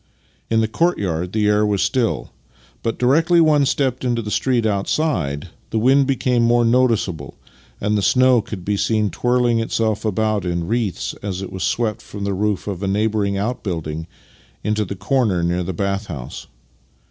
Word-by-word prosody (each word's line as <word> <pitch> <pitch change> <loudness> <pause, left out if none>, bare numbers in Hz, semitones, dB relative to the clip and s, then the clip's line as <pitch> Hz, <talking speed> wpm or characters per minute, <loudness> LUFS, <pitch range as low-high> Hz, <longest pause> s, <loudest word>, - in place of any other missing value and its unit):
In 115 0 +3
the 110 - +1
courtyard 95 - 0
the 110 0 0
air 105 0 +3
was 105 -2 +1
still, 125 -4 0 0.5
but 115 - -2
directly 160 +7 +3
one 150 -4 +4
stepped 130 -3 0
into 120 -2 0
the 105 - -5
street 125 -2 +1
outside 100 - -1 0.2
the 110 - -2
wind 135 +4 +4
became 125 -3 +1
more 120 0 +3
noticeable 115 - +1 0.4
and 105 +1 0
the 105 - +1
snow 125 +3 +4
could 105 -5 -8
be 105 0 0
seen 105 -1 +1
twirling 120 -1 +1
itself 110 -1 -1
about 110 -1 0
in 85 -1 -2
wreaths 115 -4 -1
as 95 -2 -4
it 95 - -7
was 95 - -6
swept 110 -3 -1
from 100 -1 -8
the 100 0 -1
roof 100 -1 -1
of 100 -3 -4
a 100 - -1
neighbouring 105 0 0
outbuilding 85 -8 -3 0.6
into 105 0 0
the 100 - -5
corner 100 -2 +1
near 85 +1 0
the 90 - -3
bath 100 +3 -2
house. 70 -8 -7
105 Hz, 170 wpm, -20 LUFS, 95-120 Hz, 0.6 s, one